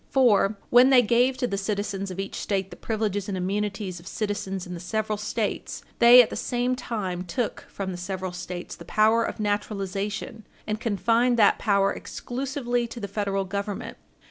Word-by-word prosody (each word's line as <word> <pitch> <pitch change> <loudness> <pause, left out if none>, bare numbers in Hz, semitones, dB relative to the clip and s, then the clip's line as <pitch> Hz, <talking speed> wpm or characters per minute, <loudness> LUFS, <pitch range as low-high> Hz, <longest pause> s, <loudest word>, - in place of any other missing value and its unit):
For, 220 -6 +4
when 250 +2 +7
they 255 -2 +7
gave 245 +3 +3
to - - 0
the 200 -5 -2
citizens 200 -1 -2
of 185 0 -7
each 195 0 -4
State 195 -2 -2
the - - -8
privileges 210 -3 -2
and 190 - -2
immunities 195 0 -2
of 170 - -14
citizens 195 -3 -3
in 180 - -7
the 175 - -6
several 215 +4 -2
States, 210 +1 -3 0.2
they 245 +1 +9
at - - -6
the - - -4
same 245 +1 0
time 195 -8 -3
took 215 +6 -3
from 195 -1 -4
the 180 - -5
several 185 0 -4
States 180 0 -6
the - - -11
power 220 +5 +3
of - - -4
naturalization, 205 +1 -3 0.2
and 215 0 -2
confined 230 +2 +2
that 210 -3 +5
power 200 -2 +2
exclusively 245 -2 -3
to 235 +1 -8
the 200 - -4
Federal 195 -1 -1
Government. 200 +1 -4
205 Hz, 180 wpm, -26 LUFS, 195-235 Hz, 0.2 s, they